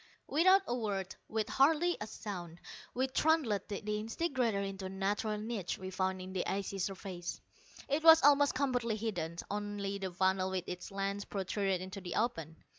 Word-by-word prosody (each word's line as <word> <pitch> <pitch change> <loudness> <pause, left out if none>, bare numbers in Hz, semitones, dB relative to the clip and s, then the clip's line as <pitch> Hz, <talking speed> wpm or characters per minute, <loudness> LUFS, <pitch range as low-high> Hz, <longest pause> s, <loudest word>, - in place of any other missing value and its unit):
Without 375 +6 +5
a - - -2
word, 200 -5 -2
with 220 -1 -1
hardly 320 +5 +3
a 210 - -3
sound, 175 -6 -7 0.4
we 260 +2 +2
trundled 265 -6 +2
the 200 -2 -4
disintegrator 225 +2 -1
into 195 -1 -4
a - - -3
natural 205 +3 -1
niche 210 -4 -3
we 190 0 -6
found 185 0 -1
in 185 0 -7
the 185 - 0
icy 195 0 -2
surface. 185 -2 -4 0.5
It 290 +3 +1
was 325 0 +9
almost 285 -1 +6
completely 250 -4 +1
hidden; 180 -7 -3 0.2
only 205 -1 -3
the 190 -1 -3
funnel 190 +1 +1
with 190 -2 -2
its 180 0 -6
lens 200 0 -2
protruded 195 -1 -1
into 190 +2 -6
the 175 -2 -5
open. 165 -9 -1
200 Hz, 170 wpm, -33 LUFS, 190-240 Hz, 0.5 s, was